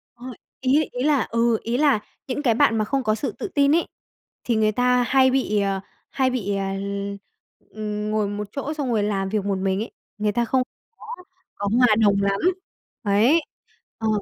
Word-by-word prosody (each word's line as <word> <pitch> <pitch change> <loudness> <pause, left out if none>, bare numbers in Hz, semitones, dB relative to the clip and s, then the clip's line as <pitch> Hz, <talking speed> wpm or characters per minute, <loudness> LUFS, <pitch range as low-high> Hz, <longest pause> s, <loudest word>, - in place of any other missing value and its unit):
Ờ, 245 - -12 0.4
ý 275 +4 +3
ý 250 - -3
là 290 -2 +3
ừ, 230 0 +2
ý 235 +2 -1
là 285 -6 +3 0.3
những 275 +2 -3
cái 240 -5 +4
bạn 230 -1 +3
mà 215 - +1
không 270 +3 -1
có 215 -3 +1
sự 275 - -3
tự 425 - -6
tin 285 -3 +3
ấy, 335 - +1 0.6
thì 235 - 0
người 215 -1 +3
ta 250 +2 +2
hay 265 -2 +4
bị, 215 -6 +1
ờ, 195 -1 0 0.3
hay 260 -2 +1
bị, 205 -6 -2
à, 195 0 -2 1.0
ừm 210 0 -4
ngồi 215 -1 +1
một 205 0 -4
chỗ 285 +4 -4
xong 285 -4 -3
rồi 215 -3 +1
làm 195 -2 -1
việc 210 -1 -1
một 200 -1 0
mình 190 0 0
ấy, 225 - -5 0.3
người 210 0 0
ta 235 +3 0
không 255 +2 +1 0.3
có - - -14 0.5
có 205 - -3
hòa 250 - +6 0.2
đồng 200 -1 +4
lắm. 200 0 +1 0.6
Ấy. 225 +10 +4 0.6
Ờ. 220 - -2
225 Hz, 200 wpm, -23 LUFS, 205-260 Hz, 1.0 s, hòa